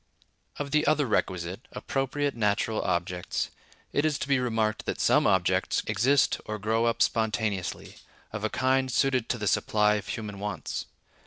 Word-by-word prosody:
Of 145 -1 -4
the 150 0 +2
other 150 -1 +3
requisite—appropriate 125 +9 -2
natural 105 0 +1
objects—it 90 +10 -3
is 155 -3 +1
to - - -4
be 140 -2 +3
remarked 110 -3 -1
that - - -2
some - - +4
objects - - +2
exist 125 +7 +2
or 110 - -4
grow 110 +3 +1
up 115 0 +3
spontaneously, 105 -5 -1 0.4
of - - -4
a - - +1
kind 130 0 +1
suited 130 -1 +1
to - - 0
the 105 - -4
supply 105 +1 +2
of 105 - -7
human 105 -4 -5
wants. 105 0 -4
110 Hz, 150 wpm, -28 LUFS, 105-135 Hz, 0.4 s, some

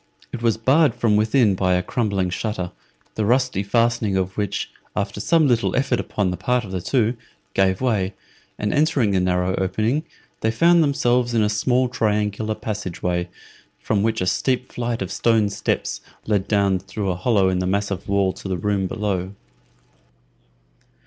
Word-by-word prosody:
It 120 - -5
was 115 -2 +2
barred 130 +3 +3
from 115 -3 +2
within 110 0 +3
by 95 -1 +1
a 90 - 0
crumbling 100 -4 -1
shutter, 95 -2 -3 0.4
the 110 - -2
rusty 125 -2 +2
fastening 115 -1 +1
of 95 0 -2
which, 105 -1 -2 0.2
after - - -2
some 165 -3 +3
little 120 -3 +1
effort 130 -2 +1
upon 100 -3 -1
the 90 - -4
part 125 +7 0
of 95 - -9
the 95 -2 -3
two, 115 +3 +1 0.4
gave 95 -1 +2
way, 105 -6 0 0.4
and 105 0 -1
entering 145 -7 +2
the 95 - +2
narrow 90 0 +1
opening, 110 +10 0 0.4
they 110 - +1
found 170 +9 +4
themselves 125 -5 +1
in 110 - +3
a 105 - +2
small 125 +4 +1
triangular 105 -2 -1
passage 105 -6 -5
way, 90 0 -1 0.5
from 100 - -1
which 110 0 0
a - - +1
steep 125 +6 0
flight 120 -3 -2
of 95 - -7
stone 110 -2 +2
steps - - -2 0.2
led 105 -3 0
down 100 -3 +2
through 95 +1 -3
a - - -2
hollow 95 0 +2
in 90 -1 0
the 90 - -1
massive 100 0 -2
wall 100 -2 +2
to - - -9
the 95 - -1
room 100 +1 0
below. 100 -3 -3
105 Hz, 175 wpm, -22 LUFS, 95-120 Hz, 0.5 s, found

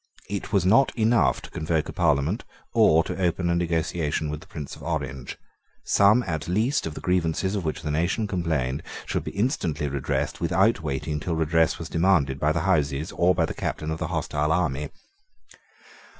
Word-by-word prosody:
It 100 0 -4
was 100 -4 +2
not 115 +8 +5
enough 115 +1 +3
to - - -10
convoke 80 0 -1
a - - -6
Parliament 80 - +1 0.3
or 80 -9 +5
to 95 - -5
open 85 0 +1
a - - +2
negotiation 80 -2 -1
with 75 0 -5
the - - -15
Prince 75 -3 -7
of - - -15
Orange. 70 -5 -4 0.5
Some 105 +5 +4
at 80 -6 -3
least 110 - +1
of 80 - -6
the - - -7
grievances 90 +1 0
of 100 -3 -2
which 80 +1 -3
the 75 - -2
nation 85 +8 0
complained 80 -9 -1 0.2
should - - -2
be - - -4
instantly 90 - -1
redressed 70 -1 -2
without 95 0 +2
waiting 75 0 -2
till 85 +2 -2
redress 80 0 +2
was 85 - -6
demanded 80 -6 +2
by 75 +1 +2
the - - 0
Houses 70 +2 0
or 90 +1 +2
by 85 - +2
the - - -5
captain 75 0 -3
of 80 - -3
the - - -2
hostile 75 +1 -1
army. 75 -4 0
80 Hz, 185 wpm, -25 LUFS, 75-95 Hz, 0.5 s, not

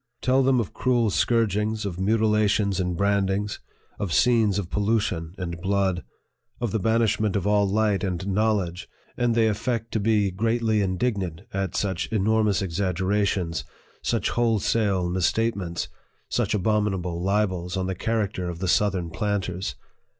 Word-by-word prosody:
Tell 130 +1 +4
them 130 -1 +3
of 110 - -3
cruel 120 -4 +1
scourgings, 110 -1 +1
of 90 -3 -4
mutilations 105 -1 +2
and 90 -2 -1
brandings, 100 +1 0 0.4
of 100 -4 -2
scenes 115 -5 +3
of 95 -3 -4
pollution 100 -6 0
and 85 -2 -5
blood, 95 -2 0 0.6
of 120 -4 -1
the 110 - 0
banishment 110 -1 +1
of 100 - 0
all 105 -1 +3
light 105 -2 +1
and 95 -2 -2
knowledge, 100 -3 0 0.3
and 120 -1 +1
they 115 -1 +4
affect 115 +1 -2
to 110 - 0
be 105 -2 +2
greatly 110 +2 +1
indignant 95 -3 -1
at 95 -2 -2
such 95 -3 -1
enormous 105 -2 +1
exagger 95 +1 -1
ations, 95 -5 0 0.4
such - - 0
wholesale 110 -5 +1
misstatements, 95 0 0 0.4
such - - 0
abominable 95 -4 0
libels 95 -2 0
on 95 - -1
the 95 - -1
character 100 -3 -2
of 85 - -5
the 95 +2 -3
southern 95 -3 +1
planters 95 - -2
100 Hz, 145 wpm, -25 LUFS, 95-110 Hz, 0.6 s, Tell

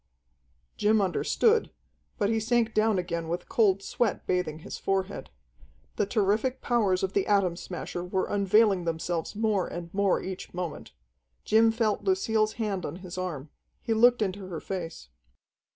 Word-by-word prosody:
Jim 215 +1 +3
understood, 435 - +2 0.5
but 205 - +1
he 225 +1 +1
sank 230 0 +1
down 215 -1 +3
again 170 -2 -2
with 175 +2 -3
cold 200 -4 +2
sweat 230 0 -1
bathing 180 -4 -1
his - - -6
forehead. 195 0 -2 0.7
The 205 - 0
terrific 220 +5 +1
powers 205 -7 +1
of 190 - -1
the 200 - +1
Atom 195 -4 +2
Smasher 175 0 -6
were 185 +1 -1
unveiling 200 -2 +3
themselves 165 +2 -2
more 210 -3 +1
and 170 0 -7
more 200 -1 +2
each 185 -1 -7
moment. 180 -3 -5 0.5
Jim 225 +1 +5
felt 225 -2 0
Lucille's 220 - +1
hand 205 -5 -2
on 145 - -4
his 175 - -7
arm. 165 -6 -5 0.3
He 230 - 0
looked 240 +1 +5
into 190 -1 -4
her 170 -4 -5
face. 165 - -6
195 Hz, 150 wpm, -28 LUFS, 180-220 Hz, 0.7 s, Jim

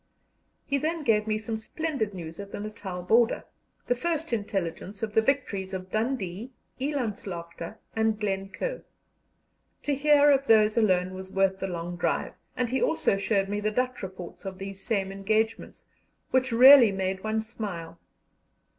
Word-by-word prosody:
He 280 0 0
then 320 +2 -2
gave 215 -4 +2
me 215 0 +1
some 220 0 -4
splendid 260 -4 -3
news 165 -1 -7
of 200 0 -7
the - - -5
Natal 200 -4 -6
border, 225 +5 +3 0.4
the - - +2
first 325 +2 -2
intelligence 200 -1 -3
of 215 -1 -2
the 220 - +5
victories 200 -7 -1
of 185 0 -7
Dundee, 220 -2 -2 0.3
Elandslaagte, 210 - -4 0.2
and 220 -1 +1
Glencoe. 200 - -3 1.0
To 290 - 0
hear 290 +1 +5
of 275 0 +2
those 215 -1 +5
alone 185 -5 +2
was 190 0 -8
worth 195 0 +2
the 195 - -2
long 175 -1 -5
drive, - - -1 0.2
and 250 -2 0
he 265 - 0
also 320 - +2
showed 195 0 +1
me 205 +1 -2
the 210 +1 0
Dutch 250 +3 -1
reports 185 -2 -8
of 190 -1 -6
these 195 0 -7
same 195 -2 -1
engagements, 215 +3 -1 0.5
which 260 0 +2
really 250 -1 +9
made 190 0 -2
one 220 0 0
smile. 195 -8 -6
215 Hz, 155 wpm, -27 LUFS, 190-245 Hz, 1.0 s, really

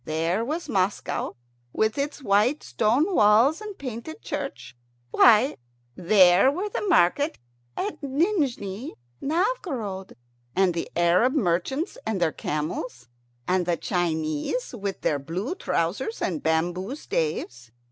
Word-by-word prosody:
There 165 +7 0
was 310 +8 -3
Moscow 190 +1 -1 0.4
with 220 0 +1
its 285 0 -3
white 215 +8 +2
stone 255 - +1
walls 230 - +5
and 420 -2 -7
painted 255 +4 -7
churches. 125 +2 -5 0.4
Why, 235 +4 +5 0.4
there 185 +4 +5
were 375 +8 -3
the - - -3
market 290 - +2 0.4
at 410 - -3
Nijni 275 - -1 0.3
Novgorod, 280 - -2 0.4
and 190 -2 +3
the 165 - -4
Arab 175 +9 +3
merchants 245 - 0
with 220 -2 0
their 170 -2 +2
camels, 150 -6 -4 0.4
and 180 -1 +1
the 175 -1 +1
Chinese 165 - -2
with 200 -4 -4
their 145 - +1
blue 180 - -4
trousers 235 - -2
and 165 -6 -2
bamboo 175 - -1
staves. 150 - -3
205 Hz, 120 wpm, -25 LUFS, 170-280 Hz, 0.4 s, walls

